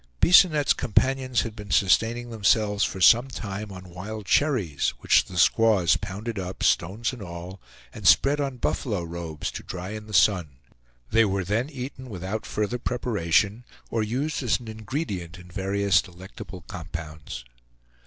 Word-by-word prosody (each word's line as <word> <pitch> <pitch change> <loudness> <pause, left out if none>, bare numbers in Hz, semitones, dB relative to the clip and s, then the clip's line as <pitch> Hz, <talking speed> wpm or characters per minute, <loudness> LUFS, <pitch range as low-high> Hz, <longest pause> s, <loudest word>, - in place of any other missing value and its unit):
Bisonette's 170 -5 +6
companions 130 +2 +1
had 115 -2 -5
been 105 -2 -9
sustaining 115 +6 +2
themselves 105 -1 +2
for 95 - -2
some 120 +7 +6
time 105 -4 -6
on 95 -1 -10
wild 105 +4 -7
cherries, 95 - +1
which - - +3
the 90 - -9
squaws 100 -3 +4
pounded 105 +3 -5
up, 95 0 -5
stones 110 +8 +1
and 125 - -9
all, 90 +1 -8 0.3
and - - -3
spread 145 +1 +5
on 135 -3 -3
buffalo 105 -6 -1
robes, 85 -2 -5
to - - -7
dry 90 +1 -6
in 105 0 -7
the - - -10
sun; 85 -9 +3 0.6
they 115 +1 +5
were 100 -2 0
then 110 +9 -1
eaten 130 -2 -7
without 100 +2 -5
further 105 +4 -2
preparation, 110 -3 0 0.3
or 115 - 0
used 130 +9 -2
as 125 -2 +1
an 120 - -12
ingredient 110 - -5
in 90 0 -14
various 100 +1 +2
delectable 95 +1 -11
compounds. 80 -7 -8
105 Hz, 155 wpm, -25 LUFS, 90-120 Hz, 0.6 s, Bisonette's